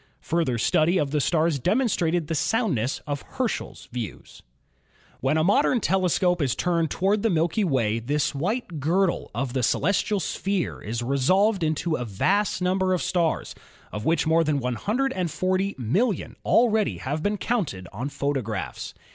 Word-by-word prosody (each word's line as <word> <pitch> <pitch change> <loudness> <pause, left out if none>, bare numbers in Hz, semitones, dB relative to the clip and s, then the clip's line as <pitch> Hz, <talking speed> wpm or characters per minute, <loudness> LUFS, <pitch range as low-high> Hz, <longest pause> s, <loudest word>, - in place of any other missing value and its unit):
Further 160 -7 0
study 155 +9 +2
of 145 -5 0
the 150 -1 +1
stars 160 -1 +1
demonstrated 175 - +1
the 160 - -3
soundness 155 - 0
of 145 -2 -3
Herschel's 255 -3 -4
views. 120 -4 -7 0.8
When 135 +4 +1
a 155 - +2
modern 240 - +3
telescope 180 -3 +1
is 130 -5 +1
turned 170 -3 0
toward 200 +3 +1
the 225 - +2
Milky 170 +4 +1
Way 115 - +1
this 145 +6 -1
white 175 - -2
girdle 170 +5 +1
of 125 +1 -2
the 130 - 0
celestial 200 - +1
sphere 195 0 -2
is 115 +3 -4
resolved 185 - +2
into 155 +1 0
a 125 - -3
vast 185 - 0
number 185 0 +2
of 180 - -2
stars 170 -3 0 0.4
of 105 +1 -5
which 165 +5 +1
more 165 +1 +3
than 150 -2 0
140,000,000 185 - -1
already 220 -3 +3
have 145 +3 -3
been 205 +4 0
counted 170 - -2
on 125 +8 -4
photographs. 135 -8 -3
165 Hz, 145 wpm, -25 LUFS, 140-195 Hz, 0.8 s, modern